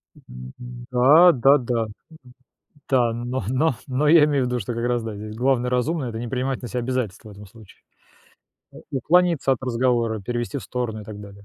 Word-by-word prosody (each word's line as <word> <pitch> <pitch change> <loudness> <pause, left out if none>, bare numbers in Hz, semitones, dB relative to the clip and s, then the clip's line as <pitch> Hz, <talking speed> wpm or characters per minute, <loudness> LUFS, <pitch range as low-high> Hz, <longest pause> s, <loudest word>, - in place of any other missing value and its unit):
М, 65 0 -12
м. 120 0 -9
Да 150 +8 +6
да 135 +2 +4
да. 120 -3 -2 1.0
Да, 125 -4 +2
но 120 +1 -4
но 130 +2 +1
но 135 +4 0
я 160 -1 +7
имею 145 -3 +1
в - - -2
виду, 125 - -1
что 115 +5 -4
как 115 +1 -3
раз 120 -1 0
да, 110 -2 -6
здесь 105 +1 -8
главное 125 0 +1
разумное- 130 +3 -1
это 110 - -6
не 120 0 -5
принимать 130 +1 -2
на 120 - -6
себя 125 - -3
обязательств 125 -5 -3
в 110 - -11
этом 105 0 -12
случае. 110 +1 -18 0.9
Э, - - -15 0.2
уклониться 165 +1 +2
от 130 - -4
разговора, 120 -3 0
перевести 120 +6 -4
в - - -10
сторону 120 -4 -4
и - - -13
так 105 -1 -9
далее. 100 0 -13
125 Hz, 205 wpm, -23 LUFS, 115-130 Hz, 1.0 s, я